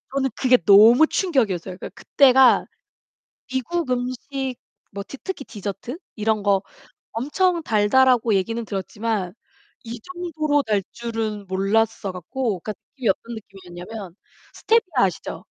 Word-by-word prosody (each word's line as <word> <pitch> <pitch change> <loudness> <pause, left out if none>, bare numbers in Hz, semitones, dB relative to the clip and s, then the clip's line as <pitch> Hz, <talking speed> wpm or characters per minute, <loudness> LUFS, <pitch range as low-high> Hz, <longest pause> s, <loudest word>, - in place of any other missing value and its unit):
저는 270 -1 +1
그게 255 -1 +4
너무 225 +9 +7
충격이었어요. 205 - 0
그니까 - - -7
그때가 265 -2 +5 0.9
"미국 265 +4 -2
음식 255 +1 -3 0.4
뭐 200 0 -6
디 275 - -10
특히 380 -8 -5
디저트 205 - -6 0.2
이런 215 -1 0
거 200 -2 +3 0.5
엄청 335 - 0
달다."라고 235 +1 +3
얘기는 225 +5 -1
들었지만 200 -1 -3 0.5
이 230 0 -7
정도로 315 -3 -1
달 210 -4 +1
줄은 225 -3 -4
몰랐어 200 +2 0
갖고 205 +2 -3
그니까 215 - -5 0.2
이게 245 -6 0
어떤 230 +5 -2
느낌이었냐면 190 -1 -10 0.4
스테비아 370 - +2
아시죠? 180 - -5
230 Hz, 300 characters per minute, -22 LUFS, 200-265 Hz, 0.9 s, 너무